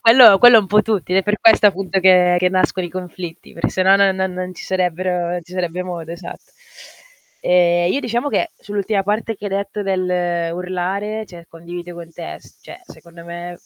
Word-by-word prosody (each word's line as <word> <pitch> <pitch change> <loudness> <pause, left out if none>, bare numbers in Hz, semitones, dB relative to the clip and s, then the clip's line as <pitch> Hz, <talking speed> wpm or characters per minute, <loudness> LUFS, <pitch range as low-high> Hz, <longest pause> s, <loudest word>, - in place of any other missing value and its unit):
Quello 230 -4 +8
quello 245 -1 +8
è - - +7
un 195 - -7
po' 210 +3 +3
tutti. 205 -5 -2
È 190 - +3
per 210 +2 -1
questo 225 -2 +5
appunto 195 -1 0
che 180 -1 +5
che 180 - +2
nascono 185 0 0
i - - -10
conflitti, 180 -2 -8
perché 170 - -2
se 185 - -1
no 190 +1 +5
non 195 -1 +3
non 190 0 -2
non 185 0 -6
ci - - -10
sarebbero 180 -1 -2
ci 180 - -17
sarebbe 180 -1 -3
modo. 170 -3 -7
Esatt 170 +1 -10 0.9
Ehm, 175 0 +3
io 280 - -1
diciamo 240 +2 -2
che 340 - -1
sull'ultima 205 -1 -2
parte 215 +2 -2
che 205 - -12
hai 205 - -3
detto 200 +1 -3
dell'urlare, 180 +2 -2
cioè 175 -3 -13
condivido 175 +1 -9
con 170 -1 -11
te, 75 - -8
s - - -21
cioè - - -12
secondo 170 0 -15
me 175 0 -8
185 Hz, 200 wpm, -18 LUFS, 175-200 Hz, 0.9 s, Quello